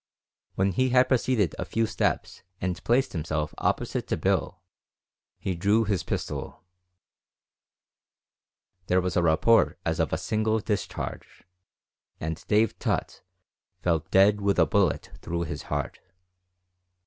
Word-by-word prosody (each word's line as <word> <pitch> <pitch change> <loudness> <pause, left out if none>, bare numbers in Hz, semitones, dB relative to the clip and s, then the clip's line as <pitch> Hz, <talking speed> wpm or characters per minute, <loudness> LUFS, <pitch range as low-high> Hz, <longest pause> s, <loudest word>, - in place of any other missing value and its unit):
When 95 +1 +2
he 130 +8 +1
had 125 0 +4
proceeded 120 - +2
a - - 0
few 115 0 0
steps - - -1 0.2
and 90 -1 -3
placed 125 +3 +2
himself 75 -2 -2
opposite - - -1
to - - -1
Bill, - - -1 0.7
he 95 - -2
drew 100 +6 +2
his 100 -4 0
pistol; - - -5 2.2
there 90 - +3
was 90 -2 -2
a 90 - +3
report 85 +8 +4
as 80 0 -1
of 80 -4 +1
a - - 0
single 110 0 0
discharge, 105 -3 -4 0.8
and 80 0 -4
Dave 110 0 +2
Tutt - - -2 0.6
fell 85 -2 +2
dead 100 +2 +5
with 100 0 +1
a 85 - +5
bullet 95 0 +1
through 85 0 -3
his 80 - -5
heart. - - -3
95 Hz, 130 wpm, -27 LUFS, 85-110 Hz, 2.2 s, dead